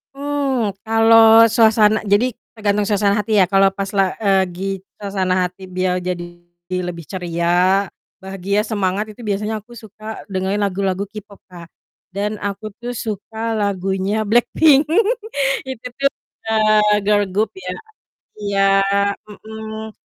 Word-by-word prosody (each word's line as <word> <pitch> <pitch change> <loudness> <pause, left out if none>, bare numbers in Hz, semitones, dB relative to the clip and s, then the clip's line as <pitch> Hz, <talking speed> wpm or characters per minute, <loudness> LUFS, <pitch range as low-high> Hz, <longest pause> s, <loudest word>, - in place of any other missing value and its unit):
Mmm, 275 -7 -1
kalau 225 0 +6
suasana 220 -1 +4
jadi 215 +4 +1 0.2
tergantung 210 -2 0
suasana 205 0 +1
hati 210 0 +1
ya 185 - +5
kalau 195 0 +4
pas 195 0 -4
la 195 -2 +3
eee, 195 -3 +3
gi 195 +2 -4 0.3
suasana 185 -2 0
hati 185 +2 -16
biar 180 0 -1
jadi 180 -1 -3 0.6
lebih 170 -2 -6
ceria, 180 +2 +1 0.3
bahagia, 195 +1 -2
semangat 200 -1 -1
itu 235 +3 -13
biasanya 210 +1 -2
aku 240 - -22
suka 215 -1 -14 0.3
dengerin 190 +2 -1
lagu-lagu 195 0 -1
K-pop, 205 -1 -12
Kak. 170 -2 -11 0.4
Dan 205 +3 -2
aku 205 +2 -4
tuh 240 +1 -5
suka 220 +1 -4
lagunya 195 0 -1
Blackpink 275 +6 +4 0.8
itu 255 -2 -6
tuh, 275 0 +2 0.4
eee, 215 -1 +4
girl 205 -1 +4
group 210 +3 0
ya. 380 - -6 0.7
Iya, 200 -1 -1 0.7
mhm. 220 +1 -8
205 Hz, 130 wpm, -19 LUFS, 190-220 Hz, 0.8 s, kalau